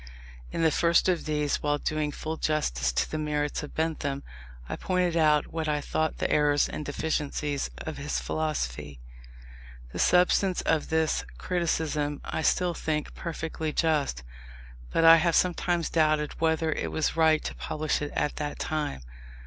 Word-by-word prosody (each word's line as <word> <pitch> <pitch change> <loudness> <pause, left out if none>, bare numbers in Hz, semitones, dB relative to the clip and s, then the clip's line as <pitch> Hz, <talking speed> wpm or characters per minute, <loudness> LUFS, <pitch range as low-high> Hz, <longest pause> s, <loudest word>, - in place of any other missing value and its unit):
In 165 - -1
the 160 - +4
first 170 +3 +3
of 180 -2 +1
these, 150 -2 0
while 145 0 +1
doing 155 0 -1
full 160 +2 -4
justice 65 - 0
to - - -1
the 155 - -2
merits 150 -1 -1
of 150 - -9
Bentham, 150 -3 -2 0.4
I - - -3
pointed 180 -2 0
out 155 -3 +3
what 160 -1 -2
I 150 0 +1
thought 155 +2 -1
the - - 0
errors 145 -1 +3
and - - -5
deficiencies 145 -1 -2
of 155 -3 -6
his 145 +2 -2
philosophy. 75 - -3 0.9
The - - -6
substance 180 +1 +3
of 160 -2 +1
this 160 - +1
criticism 155 - -1
I - - -2
still 180 +2 +2
think 155 -2 -2
perfectly 160 -2 -4
just; 150 - 0 0.7
but 165 - +2
I 165 0 +10
have 170 0 +2
sometimes 175 -2 +1
doubted 155 -2 +1
whether 160 0 +2
it - - -2
was 160 - 0
right 160 -1 +4
to - - -4
publish 155 0 -2
it 145 - -3
at 145 - -1
that 150 -1 -3
time. 150 - -2
155 Hz, 160 wpm, -27 LUFS, 145-160 Hz, 0.9 s, I